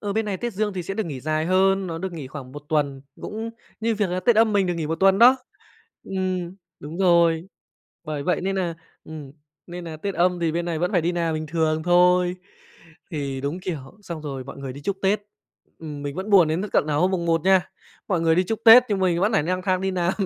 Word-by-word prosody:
Ờ, 205 -1 -3
bên 220 +2 0
này 200 -2 -2
Tết 240 +4 -4
Dương 210 +1 -1
thì 185 -2 -4
sẽ 195 +3 -5
được 220 -2 -2
nghỉ 140 -5 -6
dài 155 +3 -1
hơn, 190 +1 +2
nó 165 -2 -4
được 185 +1 -4
nghỉ 155 -5 -7
khoảng 130 -1 -9
1 145 +1 -9
tuần, 140 -4 0 0.2
cũng 225 +2 -5 0.3
như 225 0 +1
việc 205 -3 -1
là 180 +1 -1
Tết 235 +3 +3
Âm 220 -1 +4
mình 200 -2 +2
được 175 - -1
nghỉ 165 -2 -3
1 160 +1 -3
tuần 195 0 +5
đó. 250 +3 +8 0.7
Ừm, 185 -2 -3 0.3
đúng 155 +4 -8
rồi. 170 -2 +3 0.6
Bởi 150 -2 -4
vậy 180 - 0
nên 195 +1 -2
nà, 175 -3 -1 0.3
ừm, 150 -4 -9 0.3
nên 175 0 -8
nà 160 -2 -7
Tết 195 +5 -4
Âm 180 +1 +2
thì 165 -2 0
bên 170 +1 -1
này 170 -2 -2
vẫn 180 +5 -1
phải 180 - +3
đi 170 +2 0
làm 170 -2 -1
bình 155 0 -4
thường 160 0 0
thôi. 180 +1 +3 0.7
Thì 140 -5 -4
đúng, 145 +6 -3
kiểu, 180 -4 -4 0.2
xong 170 -5 -7
rồi 135 -3 -5
mọi 140 - -9
người 135 -2 -6
đi 140 - -10
chúc 200 +5 -2
Tết, 200 +2 +2 0.6
ừm, 150 -3 -7
mình 145 -1 -4
vẫn 190 +3 -4
buồn 185 -6 +6
đến 160 +4 -1
th - - -3
tận - - +2
nà 150 - -1
hôm 180 +6 +2
mùng 175 -3 -2
Một 165 -1 +2
nha. 190 -1 +3 0.4
Mọi 180 -4 +1
người 165 -1 +3
đi 180 +2 +2
chúc 220 +4 -2
Tết 230 +2 +10
nhưng 205 -2 0
mình 175 -2 +1
vẫn 205 +4 +2
phải 195 - +3
nang 185 +4 -2
thang 185 -1 0
đi 190 0 -1
làm, 180 -1 0
175 Hz, 255 wpm, -23 LUFS, 155-190 Hz, 0.7 s, Tết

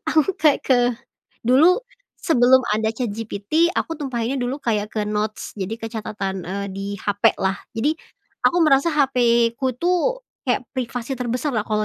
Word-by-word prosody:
aku 315 +4 +2
kayak 300 -2 +2
ke, 245 -2 +3 0.4
dulu 305 - +5 0.4
sebelum 260 -5 +5
ada 220 +1 +1
ChatGPT 225 - -1
aku 325 -3 -2
tumpahinnya 260 -3 -2
dulu 255 +3 -2
kayak 210 -4 -1
ke 210 -1 -2
notes 215 +1 -3
jadi 195 +2 -4
ke 225 - -4
catatan, 205 -4 -4
eee, 200 +3 -4
di 195 +1 -6
hapelah 195 -1 +1
jadi, 290 +8 0 0.5
aku 350 - +4
merasa 310 +1 +4
hapeku 250 -2 +2
tuh 365 +9 +1 0.2
kayak 250 -1 -1
privasi 250 -1 -4
terbesarlah 250 0 -1
kalau 215 0 +1
245 Hz, 140 wpm, -22 LUFS, 215-280 Hz, 0.5 s, dulu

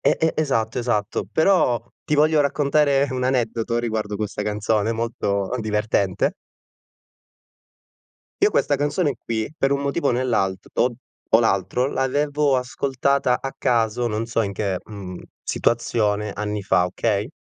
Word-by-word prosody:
e - - +3
e 160 0 +2
esatto, 120 -6 0
esatto, 105 -5 -1
però 160 - +3 0.2
ti 150 - 0
voglio 155 +1 +4
raccontare 140 0 +2
un 130 -1 -2
aneddoto 120 -2 0
riguardo 110 -3 -2
questa 105 -1 -3
canzone 105 +1 0
molto, 100 -4 -2
uhm, 125 - -1
divertente 105 -3 0 2.1
io - - +5
questa - - +2
canzone 145 0 0
qui, 110 -1 -2
per 135 - +1
un 140 - 0
motivo 140 +2 0
o - - +4
nell'alt 115 -7 0
to 125 0 +2 0.4
o 115 - +8
l'altro, 110 +3 +1
l'avevo 145 +1 +1
ascoltata 130 0 0
a 135 - -5
caso, 120 -1 +1
non 110 +1 -2
so 115 -1 0
in 100 - -3
che, 95 -2 -2
mhmm, 95 -4 -8 0.3
situazione, 105 -3 0
anni 105 0 -3
fa, 90 -2 +3
okay? 105 - -1
115 Hz, 140 wpm, -22 LUFS, 105-135 Hz, 2.1 s, o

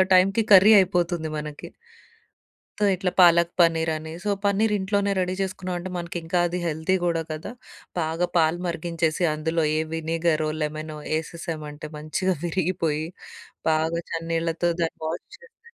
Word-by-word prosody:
టైంకి 195 +4 +4
కర్రీ 200 +4 +9
అయిపోతుంది 175 -3 -1
మనకి. 150 -1 -7 1.1
తో - - +1
ఇట్లా 185 0 -1
పాలక్ 170 -1 +6
పన్నీరని. 160 -1 +1
సో, 210 - -1 0.2
పన్నీరింట్లోనే 200 -1 +1
రెడీ 185 0 0
చేసుకున్నాం 185 -1 -3
అంటే, 185 +2 -6
మనకింకా 170 0 -3
అది 180 +1 -3
హెల్తీ 160 +3 0
కూడా 165 -1 +1
కదా! 155 +7 -5 0.5
బాగా 165 +2 0
పాలు 160 +1 +3
మరిగించేసి, 170 0 -1
అందులో 160 +1 -1
ఏ - - +2
వినిగరో, 160 -1 0
లెమనో 155 0 -4 0.2
ఎసేసాము 160 -1 -5
అంటే, 150 +1 -8
మంచిగా 170 +5 -1
విరిగిపోయి 165 -3 -1 0.6
బాగా 160 +2 +1
చన్నీళ్ళతో 165 +1 -1
దాన్ని 165 - -2
వాష్ 170 +3 -5
చేసి 470 -1 -21
170 Hz, 130 wpm, -24 LUFS, 160-185 Hz, 1.1 s, కర్రీ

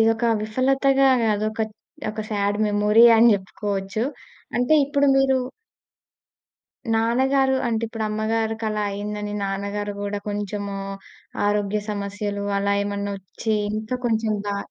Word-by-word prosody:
ఇదొక 225 +1 +3 0.2
విఫలతగా 270 +4 +3
గాదు 215 -1 +1
ఒక 220 0 -2 0.5
ఒక 215 - -5
సాడ్ 205 0 0
మెమొరీ 210 +2 +5
అని 230 +1 +7
జెప్పుకోవచ్చు. 195 +2 -3 0.5
అంటే 250 +5 +3
ఇప్పుడు 285 0 +1
మీరు 270 -1 +3 1.5
నాన్నగారు 265 +4 +2
అంటే 230 -1 -1
ఇప్పుడు 225 -1 -4
అమ్మగారికలా 220 0 -1
అయిందని, 210 +1 -4
నాన్నగారు 200 +1 -3
గూడా 205 0 -2
కొంచెము 205 -1 -3 0.7
ఆరోగ్య 205 0 0
సమస్యలు 205 0 -3
అలా 200 0 +1
ఏమన్నా 200 0 -3
ఒచ్చి 215 +4 -3 0.3
ఇంకా 220 +4 -3
కొంచెం 220 -1 +1
బా 200 0 -1
215 Hz, 115 wpm, -23 LUFS, 205-225 Hz, 1.5 s, అని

